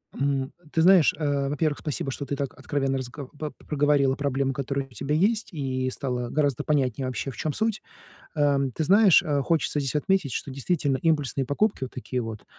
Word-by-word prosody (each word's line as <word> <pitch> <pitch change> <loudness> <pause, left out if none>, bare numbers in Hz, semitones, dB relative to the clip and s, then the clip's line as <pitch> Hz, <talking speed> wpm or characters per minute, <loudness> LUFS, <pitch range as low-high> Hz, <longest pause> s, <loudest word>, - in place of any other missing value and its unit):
М, 135 0 0
э, - - -10 0.2
ты 160 - +2
знаешь, 180 -3 +6
а, 140 -2 0
во-первых, 150 0 0
спасибо, 145 -3 -3
что 140 - -5
ты 140 - -3
так 140 -2 -3
откровенно 135 -2 -1
разго 130 +1 -6
по 150 -1 -4
проговорила 145 -2 +1
проблемы, 140 -1 -1
которые 140 0 -3
у - - -26
тебя 135 +5 -3
есть, 210 +8 +2
и 130 -3 -2
стало 125 -3 -3
гораздо 145 -3 0
понятнее 135 -4 0
вообще, 130 +2 -3
в 120 - -9
чём 155 -2 -2
суть. 220 -1 0 0.5
Ам 140 -3 +2
ты 160 - -2
знаешь, 195 +2 +6
а, 145 -2 0
хочется 150 +1 0
здесь 135 0 -2
отметить, 170 -3 +1
что 135 - -4
действительно 140 0 0
импульсные 145 -5 +1
покупки, 170 - 0
вот 130 - -5
такие 125 0 -3
вот, 110 -2 -7
140 Hz, 195 wpm, -26 LUFS, 135-150 Hz, 0.5 s, знаешь